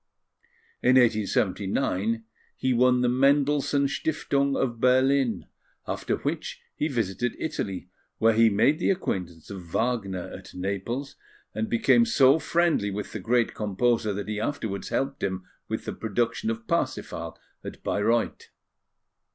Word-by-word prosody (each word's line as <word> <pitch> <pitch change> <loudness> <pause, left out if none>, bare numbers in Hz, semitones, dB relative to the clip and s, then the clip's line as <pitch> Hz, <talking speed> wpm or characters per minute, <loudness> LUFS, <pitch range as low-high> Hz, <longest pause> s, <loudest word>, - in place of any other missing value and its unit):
In 130 - +4
1879, 110 -1 +1 0.3
he 130 - +1
won 125 +1 +4
the 125 - +2
Mendelssohn 140 +2 +3
Stiftung 140 -1 0
of 120 -3 -1
Berlin; 130 0 +3 0.4
after - - -1
which - - -4 0.2
he 150 - 0
visited 115 - -1
Italy, 95 - -4 0.3
where 115 0 +4
he 115 +1 +5
made 125 - +3
the - - +1
acquaintance 90 - -3
of 95 -2 -6
Wagner 100 -2 -1
at - - -11
Naples, 100 +9 -4 0.4
and 225 - -2
became 235 +1 +4
so 140 - +5
friendly 170 -12 +1
with 100 0 -5
the 105 - -5
great 115 +4 +1
composer 110 +2 0
that 100 0 -4
he 105 0 -3
afterwards 110 -6 -3
helped 135 +1 -2
him 95 -1 -2 0.2
with - - -4
the - - -3
production 115 - -1
of 230 0 -4
Parsifal 170 -5 -2 0.3
at - - -9
Bayreuth. 115 +3 0
120 Hz, 135 wpm, -26 LUFS, 100-140 Hz, 0.4 s, he